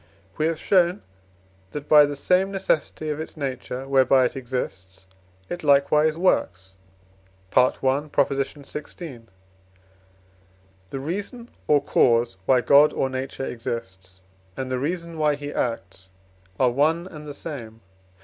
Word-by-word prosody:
For - - -29
we 155 - +2
have 165 -1 -2
shown, 180 0 +2 0.7
that 145 0 -6
by 150 -1 +7
the 145 - -4
same 180 +7 +2
necessity 165 -5 -1
of 150 - -4
its 160 - -7
nature, 135 -2 -4
whereby 135 -1 +4
it 125 - -2
exists, 95 -7 -5 0.4
it 175 -1 -6
likewise 150 +2 +3
works 95 - 0 0.8
(I. 125 0 +6
xvi.). 140 +1 -2 1.7
The 135 - -5
reason 205 - -5 0.2
or 145 -1 +4
cause 115 -3 +2
why 130 -2 +5
God 145 +4 +6
or 135 - -1
Nature 130 +1 -4
exists, 95 -7 -6 0.3
and 130 -1 -4
the 130 - -1
reason 170 +3 -3
why 150 -1 +2
he 145 0 -7
acts, 95 -5 -3 0.5
are 125 -2 +4
one 155 +7 +1
and 150 -5 -10
the 145 - -6
same. 115 -9 -8
140 Hz, 130 wpm, -24 LUFS, 125-155 Hz, 1.7 s, by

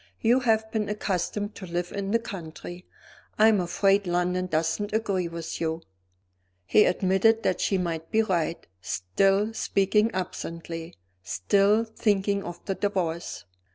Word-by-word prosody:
"You 240 +3 +4
have 220 -3 +1
been 215 -2 -1
accustomed 205 0 -2
to 185 - -9
live 175 +1 -3
in 200 -1 -3
the 230 - +3
country; 175 -4 -8 0.5
I 220 +1 +7
am 210 -3 +3
afraid 195 +3 +2
London 180 +1 0
doesn't 165 +5 -1
agree 200 -5 0
with 170 0 -6
you." 160 0 -2 0.8
He 210 - +5
admitted 190 +5 +3
that 185 - 0
she 195 - +2
might 165 -3 -3
be 220 0 +3
right; 170 -5 -1 0.2
still 195 - +1
speaking 210 +1 +2
absently, 165 - -5 0.3
still 200 - +2
thinking 200 -3 0
of 175 0 -8
the 195 - -1
Divorce. 185 -5 -2
190 Hz, 140 wpm, -26 LUFS, 170-210 Hz, 0.8 s, I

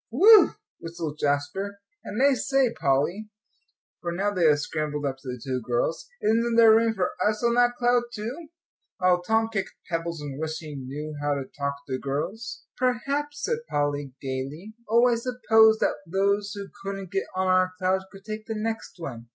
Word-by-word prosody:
"Whew!" 430 +2 +7 0.2
whistled 165 -2 -6
Jasper. 170 +8 -1 0.2
"And 225 +6 -1
I 280 0 +6
say, 265 -2 +1
Polly," 160 +11 0 0.7
for 170 - -3
now 200 +4 -1
they 180 -4 +2
had 150 -1 +5
scrambled 150 0 -3
up 135 -1 -2
to 135 - -14
the 125 -1 -4
two 130 +1 -3
girls, 120 - -1
"isn't 230 +2 +2
there 225 -1 +8
room 225 0 +3
for 185 -2 0
us 210 +2 0
on 235 0 +3
that 245 0 +3
cloud 245 0 +3
too?" 240 +10 -6 0.5
While 180 -1 +3
Tom 225 +4 +1
kicked 195 -3 -3 0.2
pebbles, 165 0 -2
and 145 -2 -6
wished 160 0 -3
he 155 -2 -8
knew 145 +3 -6
how 145 0 +1
to 140 - -3
talk 140 0 -2
to 130 -1 -3
girls. 200 +11 -4
"Perhaps," 280 +4 -1
said 470 -1 0
Polly, 145 -2 -1
gaily. 140 +9 -5 0.2
"Oh, 235 +2 +5
I 245 - +3
suppose 225 -2 +4
that - - +1
those 200 +3 +1
who 200 -1 -7
couldn't 195 -2 -5
get 195 -1 -1
on 185 0 0
our 185 0 +3
cloud 185 +1 +1
could 195 0 -14
take 215 0 -6
the 220 - -3
next 225 +1 -3
one." 120 -9 -7
190 Hz, 185 wpm, -26 LUFS, 145-225 Hz, 0.7 s, there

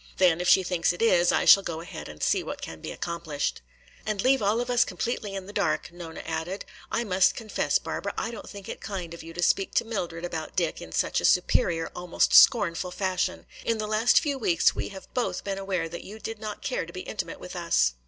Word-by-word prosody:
Then 175 -2 +4
if 180 - -1
she 190 - +6
thinks 175 -1 +1
it 175 - -8
is, 175 -6 +4
I - - +1
shall 195 - +9
go 165 -4 -4
ahead 170 -1 -8
and 75 0 -8
see - - +2
what - - -6
can 80 -1 -8
be - - -6
accomplished." 165 - -3 0.4
"And 215 -2 -2
leave 260 +4 +3
all 210 +3 +2
of 245 - -2
us 245 - +5
completely 205 +1 -3
in 190 -1 -5
the 205 - -10
dark," 175 -5 0
Nona 170 -2 -8
added. 170 +4 -4 0.3
"I 235 - 0
must 185 -3 +3
confess, 220 -2 0
Barbara, - - -4
I 230 - -2
don't 225 - -9
think 200 -1 -10
it - - -7
kind 190 -4 -5
of 170 - -9
you 165 - -9
to 175 - -1
speak 195 +3 +2
to - - +3
Mildred 175 -6 -4
about 160 -2 -5
Dick 170 -4 0
in 80 - -9
such - - +1
a - - -8
superior, 165 -1 +2
almost 175 -1 0
scornful, 180 -5 +6
fashion. 185 0 -2 0.2
In 230 - 0
the 215 - -2
last 215 +3 +4
few 285 -4 -2
weeks 175 -8 +3
we - - -4
have 190 -1 -11
both 195 -8 -1
been 195 -1 -3
aware 190 -4 -1
that 170 +1 -7
you 210 +3 -9
did 220 0 -6
not 215 -1 -6
care - - -2
to - - -9
be - - -6
intimate - - -5
with - - -9
us. - - +2
185 Hz, 235 wpm, -27 LUFS, 170-210 Hz, 0.4 s, shall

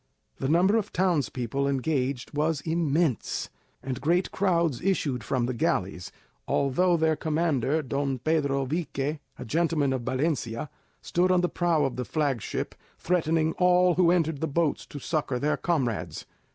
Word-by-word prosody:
The 135 - -1
number 185 +7 +4
of 210 -2 -2
townspeople 140 -7 0
engaged 135 -2 -1
was 150 0 0
immense, 160 -5 0 0.3
and 130 -1 -4
great 175 +6 +1
crowds 170 -8 +1
issued 145 - 0
from 125 +2 0
the 130 - -2
galleys, 95 - -1 0.4
although 170 +6 +2
their 160 -1 +2
commander, 155 -2 0
Don 140 0 -1
Pedro 140 -1 0
Vique, 150 0 -2 0.2
a - - -7
gentleman 155 0 +1
of 130 - -2
Valencia, 130 -1 -2 0.3
stood 180 +2 +1
on 180 -1 +4
the 180 - +1
prow 170 -4 +1
of 130 -2 -3
the 125 - -2
flag 140 -6 0
ship, - - -4 0.2
threatening 160 -2 +1
all 180 0 +5
who 175 0 +4
entered 165 -4 +1
the 160 - 0
boats 160 +1 0
to - - -9
succour 145 -2 -1
their 150 +4 +1
comrades. 135 -10 -2
150 Hz, 150 wpm, -27 LUFS, 135-170 Hz, 0.4 s, all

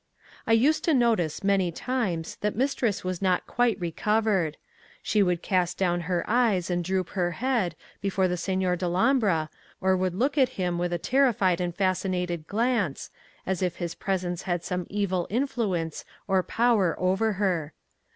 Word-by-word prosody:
I 225 - +4
used 280 +8 +3
to 320 - +3
notice, 225 - +1
many 195 -3 +2
times, 190 -6 -2
that 210 0 -2
mistress 245 -4 0
was 185 -1 -3
not 185 -2 +1
quite 235 -4 +1
recovered. 190 -1 0 0.5
She 210 - +2
would 180 -3 +1
cast 180 -2 0
down 175 -2 +1
her 175 -2 0
eyes 215 -7 +2
and 175 0 0
droop 185 0 -1
her 175 -3 -1
head, 230 -9 0 0.3
before 195 -1 +1
the 180 - -1
Signor 185 0 0
Dellombra, 180 - +1 0.3
or 190 0 +2
would 185 -1 -1
look 275 +7 +1
at 260 -2 +4
him 175 -2 -1
with 175 0 -1
a 175 - 0
terrified 200 -4 +2
and 175 -1 -2
fascinated 180 -3 -1
glance, 225 - -1 0.3
as 190 -1 -2
if 180 -2 0
his 170 -2 -4
presence 180 -3 -2
had 175 -2 -2
some 180 -1 -3
evil 190 -3 -1
influence 210 - -1 0.2
or 190 -1 +3
power 220 -5 +2
upon 195 +4 +1
her. 180 -6 -1
185 Hz, 160 wpm, -26 LUFS, 175-220 Hz, 0.5 s, I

